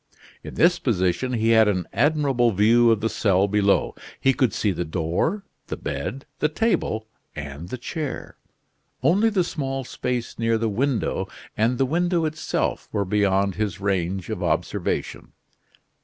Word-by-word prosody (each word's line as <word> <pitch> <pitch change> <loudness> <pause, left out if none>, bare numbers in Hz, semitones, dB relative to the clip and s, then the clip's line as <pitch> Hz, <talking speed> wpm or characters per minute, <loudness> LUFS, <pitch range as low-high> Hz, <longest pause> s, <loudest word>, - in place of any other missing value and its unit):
In - - -8
this 175 +1 +4
position 100 +2 0
he 115 -1 +1
had 110 -1 +6
an 90 -4 0
admirable 135 -3 +2
view 115 +4 +5
of 110 -2 +3
the 110 - +1
cell 100 -3 +2
below. 100 -1 +2 0.3
He 135 - +3
could 130 -3 +2
see 105 - 0
the 90 -1 -2
door, 85 - -1 0.2
the - - -4
bed, 70 - -4
the 150 - +2
table, 155 - 0 0.3
and 75 +3 -7
the 130 - -4
chair; 145 +2 -5 0.7
only 205 +7 +4
the 195 -4 +1
small 135 -5 -3
space 125 -1 -4
near 115 0 +2
the 115 0 0
window 125 +4 -1 0.3
and 115 +3 +1
the 135 - +2
window 170 +3 +1
itself 155 0 -2
were 100 - 0
beyond 100 0 +2
his 105 -2 -2
range 95 -2 -1
of - - -4
observation. - - -2
115 Hz, 155 wpm, -24 LUFS, 100-135 Hz, 0.7 s, had